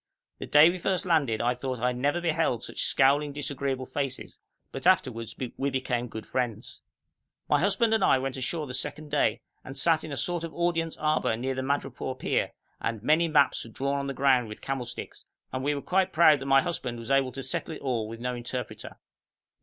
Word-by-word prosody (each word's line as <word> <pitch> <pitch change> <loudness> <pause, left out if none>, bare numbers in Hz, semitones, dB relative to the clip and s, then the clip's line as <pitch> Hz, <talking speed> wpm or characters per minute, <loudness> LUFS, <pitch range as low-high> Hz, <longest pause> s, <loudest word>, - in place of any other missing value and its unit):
The - - -6
day 150 +3 +7
we 185 - -5
first 185 +1 0
landed 145 -11 +2
I 120 +1 +2
thought 130 +1 -4
I 125 +2 +1
never 135 +5 0
had 175 - -2
beheld 160 -8 +1
such - - -4
scowling, 145 +2 +3
disagreeable 140 -2 -2
faces, 135 0 -4 0.3
but 135 +6 -2
afterwards 125 -11 +2 0.2
we 140 - 0
became 125 -2 -1
good 110 -1 -7
friends. 120 -4 -3 0.7
My - - +3
husband 220 +4 +2
and 220 -3 +2
I 135 - +5
went 130 0 -3
ashore 150 +4 -2
the 125 - -7
second 150 +3 -4
day, - - +1 0.2
and 135 - -8
sat 165 -2 +3
in 155 - -7
a 140 - -4
sort 175 +6 +1
of 165 - -6
audience 165 -1 0
arbour 155 -7 +1
near 130 +3 -2
the 130 - -3
madrepore 130 -1 -2
pier, - - 0 0.3
and 115 -2 -3
many 155 +5 +3
maps 150 -3 +3
were 115 - -11
drawn 140 +5 -2
on 140 - -3
the 135 - -4
ground 130 -3 +3
with 105 - -8
camel 135 -2 -3
sticks, - - -7 0.3
and 130 0 -2
we 145 +1 +1
were 140 - -5
quite 190 0 +1
proud 155 -3 +6
that 135 - -6
my 135 0 +5
husband 125 -9 -3
was 115 +2 -6
able 135 -1 +3
to 135 +1 -6
settle 160 - -3
it - - -11
all 120 -5 -1
with 115 0 -8
no 125 +1 -2
interpreter. 125 +1 -6
135 Hz, 215 wpm, -27 LUFS, 125-155 Hz, 0.7 s, day